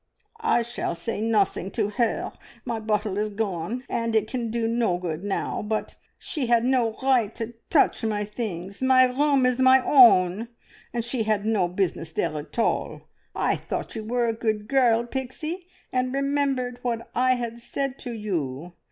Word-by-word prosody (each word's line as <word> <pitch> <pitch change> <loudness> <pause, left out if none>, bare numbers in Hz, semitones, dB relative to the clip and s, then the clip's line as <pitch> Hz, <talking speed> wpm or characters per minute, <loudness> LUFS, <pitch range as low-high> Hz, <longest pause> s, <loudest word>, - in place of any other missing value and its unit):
"I 440 - +3
shall 235 -7 -3
say 205 +5 -4
nothing 210 -4 +1
to 210 -2 0
her. 235 +1 -1 0.3
My 230 - -2
bottle 210 -2 -1
is 215 0 0
gone, 210 +3 -3
and 230 -1 -1
it 215 -1 +2
can 235 -1 -3
do 230 0 -1
no 230 -6 +1
good 170 -1 -4
now. 200 -1 -2
But 215 +1 -3 0.2
she 285 -7 -3
had 235 0 +3
no 245 -4 +2
right 245 -5 +2
to 230 0 -5 0.2
touch 290 - +3
my 210 -2 0
things. 200 -3 -5
My 260 0 +6
room 275 +1 +2
is 250 0 +1
my 260 0 +7
own, 225 -6 +6 0.4
and 235 -1 -2
she 240 0 -2
had 215 -2 0
no 215 -5 +2
business 175 -3 -2
there 155 - -1
at 145 - -11
all. 230 - -1 0.3
I - - +1
thought - - -5
you 220 - -4
were 240 +2 0
a 230 - +1
good 215 -2 -2
girl, 240 -4 +3
Pixie, 305 +8 -5 0.3
and 255 0 +1
remembered 275 -3 0
what 230 -2 -3
I 255 +1 +3
had 235 -1 -4
said 275 +2 -4
to 245 - -6
you. 175 - -4
230 Hz, 175 wpm, -25 LUFS, 210-255 Hz, 0.4 s, my